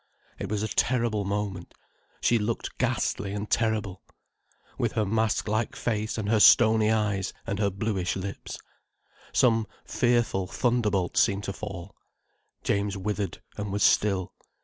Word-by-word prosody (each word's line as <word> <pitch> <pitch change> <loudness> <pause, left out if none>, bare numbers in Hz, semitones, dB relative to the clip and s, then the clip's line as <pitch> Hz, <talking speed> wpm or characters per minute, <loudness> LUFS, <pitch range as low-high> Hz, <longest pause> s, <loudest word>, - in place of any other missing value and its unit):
It 100 - -4
was 105 0 -1
a - - 0
terrible 115 -4 +1
moment. 100 -3 -3 0.5
She 120 - +3
looked 110 +2 -3
ghastly 100 0 0
and 105 +1 -4
terrible, 110 -5 0 0.7
with - - -1
her 110 - +1
mask 110 +2 0
like 110 +1 -1
face 110 -2 -2
and 105 -2 -2
her 110 0 +3
stony 110 0 +6
eyes 105 -3 0
and 100 - -3
her 100 -1 +2
bluish 100 -2 -2
lips. 95 +1 -6 0.7
Some 115 -3 +3 0.2
fearful 120 -6 +1
thunderbolt 105 -6 0
seemed 100 0 +3
to 100 - -3
fall. 100 -2 -7 0.7
James 100 0 0
withered, 100 -2 -3
and 105 -1 -4
was 100 0 0
still. 95 -3 +2
105 Hz, 140 wpm, -27 LUFS, 100-110 Hz, 0.7 s, stony